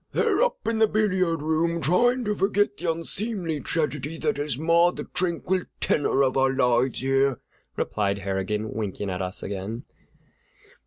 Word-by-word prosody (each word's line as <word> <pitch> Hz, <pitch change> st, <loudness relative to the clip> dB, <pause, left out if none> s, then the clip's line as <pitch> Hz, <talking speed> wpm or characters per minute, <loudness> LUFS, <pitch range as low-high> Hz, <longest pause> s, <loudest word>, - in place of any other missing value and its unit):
"They're -, -, +2 dB
all -, -, +6 dB
up 485 Hz, -, -12 dB
in 225 Hz, -1 st, 0 dB
the 220 Hz, -, +5 dB
billiard 185 Hz, -7 st, +1 dB
room, 165 Hz, +2 st, +1 dB
trying 240 Hz, -, +2 dB
to 210 Hz, -, +1 dB
forget 205 Hz, +1 st, +1 dB
the 170 Hz, -, -1 dB
unseemly 170 Hz, 0 st, -2 dB
tragedy 150 Hz, +1 st, -2 dB
that 220 Hz, +6 st, -1 dB
has 145 Hz, -3 st, 0 dB
marred 170 Hz, +3 st, +3 dB
the -, -, -5 dB
tranquil 180 Hz, +1 st, -1 dB, 0.2 s
tenor 140 Hz, -2 st, +2 dB
of 130 Hz, -1 st, +1 dB
our 135 Hz, 0 st, +3 dB
lives 125 Hz, -1 st, +1 dB
here," 135 Hz, -1 st, +2 dB, 0.4 s
replied 100 Hz, -2 st, -1 dB
Harrigan, 100 Hz, +2 st, -3 dB
winking 105 Hz, -2 st, -3 dB
at 90 Hz, +1 st, -3 dB
us 95 Hz, +2 st, -2 dB
again. 100 Hz, +4 st, -5 dB
155 Hz, 160 wpm, -25 LUFS, 120-185 Hz, 0.4 s, all